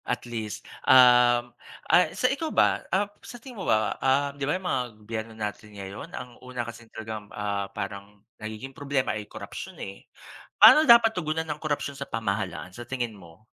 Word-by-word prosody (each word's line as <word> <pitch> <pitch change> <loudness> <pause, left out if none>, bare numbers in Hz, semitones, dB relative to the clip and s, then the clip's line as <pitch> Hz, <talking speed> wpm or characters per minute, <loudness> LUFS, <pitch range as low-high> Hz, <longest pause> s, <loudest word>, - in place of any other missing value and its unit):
At 125 - -3
least, 110 -3 -5 0.2
um, 125 -1 +6 0.3
ah 180 - +4
sa - - 0
ikaw 280 +5 +1
ba? - - +3
Ah, 195 +2 +2 0.2
sa 245 - -10
tingin 240 -3 -10
mo - - -3
ba, 110 0 +2
ah, 140 +2 +2
di 140 0 -3
ba, 165 - +1
yung 190 - -12
mga 130 -7 0
gobyerno 110 +1 -6
natin 105 0 -6
ngayon 100 +1 -8
ang 125 -1 -10
una 125 -2 -5
kasing 115 -1 -10
talagang 110 -2 -7
ah, 100 -1 -3
parang 100 +1 -7 0.2
nagiging 110 +5 -7
problema 140 -4 -1
ay 105 -1 -6
korapsiyon, - - -8
eh. 100 0 -9 0.5
Paano 310 -3 +8
dapat 235 -1 +8
tugunan 160 -3 -2
ang 150 -1 -5
korapsiyon 145 -2 -2
sa 140 - -7
pamahalaan, 100 -4 -3
sa 120 - -9
tingin 120 -3 -2
mo? 85 +2 -17
120 Hz, 180 wpm, -26 LUFS, 105-145 Hz, 0.5 s, Paano